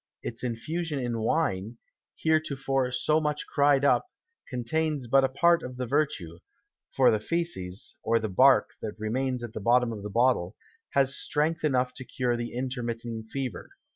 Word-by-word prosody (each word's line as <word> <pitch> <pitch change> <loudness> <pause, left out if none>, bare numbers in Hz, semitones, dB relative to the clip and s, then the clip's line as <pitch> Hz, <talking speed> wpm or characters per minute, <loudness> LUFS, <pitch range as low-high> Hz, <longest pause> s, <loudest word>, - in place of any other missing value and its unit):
Its 115 +1 -5
Infusion 150 +7 -3
in 120 -3 -2
Wine, 115 -4 0 0.4
heretofore 135 -5 0
so 150 +5 +2
much 150 -1 -1
cry'd 140 -1 +3
up, 140 - +3 0.4
contains 140 +3 -1
but 135 +3 +4
a 135 - +2
part 170 +5 +3
of 125 -3 -7
the 125 - -2
Vertue; 130 - -1 0.5
for - - +4
the 110 - +1
Fæces, 110 - -3
or 115 - +2
the 110 -1 -1
Bark 130 +7 +5
that 110 - -5
remains 125 +3 -1
at 115 -1 -6
the 110 - -5
bottom 120 +2 +3
of 105 - -7
the 105 - -5
Bottle, 115 -4 +2 0.4
has 140 0 +3
Strength 160 +3 -1
enough 130 -4 +1
to 130 - -7
cure 125 -1 -1
the 120 0 -4
intermitting 120 -3 -4
Fever. 125 -5 -5
125 Hz, 165 wpm, -28 LUFS, 115-145 Hz, 0.5 s, Bark